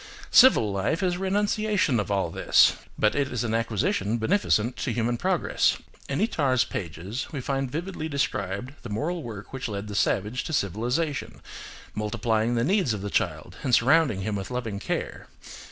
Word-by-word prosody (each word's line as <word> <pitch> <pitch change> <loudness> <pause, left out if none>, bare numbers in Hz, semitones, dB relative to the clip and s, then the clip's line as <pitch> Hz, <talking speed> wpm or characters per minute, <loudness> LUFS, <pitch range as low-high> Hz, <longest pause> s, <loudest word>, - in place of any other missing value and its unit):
Civil 245 - +7
life 100 - -1
is 180 -1 +2
a - - -8
renunciation 205 - +1
of 105 - -2
all 95 -4 0
this: - - +4 0.2
but 105 - +3
it 140 -2 0
is 120 -2 -1
an 115 -2 -2
acquisition 115 -1 0
beneficent 120 - +1
to 125 - -2
human 120 +1 0
progress. - - +1 0.3
In 140 - -1
Itard's 140 - +2
pages 95 - -5
we 145 - -4
find 135 0 -2
vividly 160 +2 -4
described 125 -4 -2
the - - -8
moral 160 +12 -2
work 110 -5 -8
which 130 -1 -3
led 105 -1 -5
the 105 - -6
savage 105 +4 0
to 160 - -4
civilisation, 125 - -1 0.5
multiplying 110 +2 0
the 115 - +1
needs 180 - +2
of 100 - -6
the 100 - -4
child 85 -3 -2
and 130 -4 +3
surrounding 135 -5 +3
him 105 +1 -2
with 95 -1 -4
loving 115 -5 -3
care. - - -4
120 Hz, 170 wpm, -26 LUFS, 105-145 Hz, 0.5 s, Civil